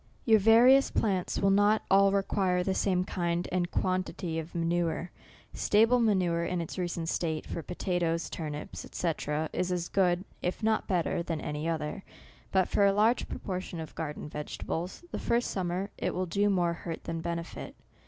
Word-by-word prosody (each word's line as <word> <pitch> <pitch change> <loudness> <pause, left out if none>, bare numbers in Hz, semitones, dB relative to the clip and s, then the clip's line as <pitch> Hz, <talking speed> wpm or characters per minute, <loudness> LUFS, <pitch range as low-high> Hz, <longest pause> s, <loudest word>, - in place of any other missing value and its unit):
Your 220 -2 +6
various 240 +6 +6
plants 190 -5 0
will 195 - +3
not 205 +2 +4
all 195 0 +6
require 190 -2 +1
the 190 - 0
same 185 -2 +1
kind 175 -1 -1
and 180 -1 0
quantity 185 -3 -1
of 160 +2 -8
manure. 170 0 -1 0.4
Sta 210 +2 +4
ble 250 +2 +3
manure, 185 -7 +2
in 180 +1 -1
its 170 +2 -5
recent 175 -2 -2
state, 160 -2 -1
for 170 - -4
potatoes, 175 -1 -1
turnips, 150 -2 -6
&c. 170 - 0 0.4
is 180 0 -1
as 175 -1 -2
good, 180 -1 +2 0.2
if 180 +5 -3
not 220 0 +1
better 175 -2 0
than 165 -2 -3
any 150 +2 -3
other. 165 +4 -3 0.5
But 190 -2 +3
for 205 - +2
a 200 0 +5
large 220 +4 +2
proportion 185 -3 -5
of 160 - -7
garden 150 -2 -5
vegetables, 160 - -5
the - - -3
first 235 +1 0
summer, 185 +1 -2
it - - -1
will 185 +1 0
do 200 +4 +1
more 175 -3 +2
hurt 165 -1 -6
than 165 -1 -4
benefit. 170 0 -5
180 Hz, 175 wpm, -29 LUFS, 170-195 Hz, 0.5 s, Your